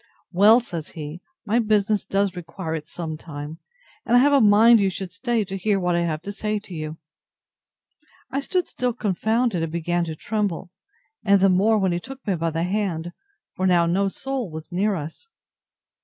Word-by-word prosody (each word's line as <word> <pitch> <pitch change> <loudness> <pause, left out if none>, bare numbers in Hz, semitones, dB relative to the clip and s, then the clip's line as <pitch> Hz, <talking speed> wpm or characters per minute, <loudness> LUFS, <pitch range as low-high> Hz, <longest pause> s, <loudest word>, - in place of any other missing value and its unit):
Well, 210 +6 +6
says 170 -9 -6
he, 155 +3 -6 0.2
my 225 +3 +2
business 210 -2 +1
does 195 -1 0
require 165 -1 -6
it 155 -2 -5
sometimes; 155 -2 -7 0.4
and 240 +1 +3
I - - +7
have 285 +3 +4
a 280 - +5
mind 220 +2 +7
you 195 -1 +2
should 190 -1 -6
stay 230 +2 -1
to 195 - -6
hear 195 +1 +1
what 180 -1 +1
I - - +2
have 165 -2 -2
to 200 - -5
say 210 +1 -2
to 200 -2 -9
you. 155 -1 -5 1.3
I 275 - 0
stood 360 +5 -1
still 250 -1 -2
confounded, 220 0 0
and 165 -1 -2
began 175 +1 -1
to 160 -1 -5
tremble, 195 -2 -2 0.5
and 200 -2 +4
the 195 +1 +5
more 205 +4 +3
when 190 -3 +1
he 175 - -1
took 265 +7 -11
me 200 - +1
by 165 -1 -1
the 165 +1 -2
hand; 180 -3 -2 0.4
for 185 - 0
now 175 -2 +4
no 190 +4 +1
soul 265 +1 -4
was 160 +2 -9
near 200 +3 +1
us. 165 - -8
190 Hz, 190 wpm, -23 LUFS, 170-215 Hz, 1.3 s, I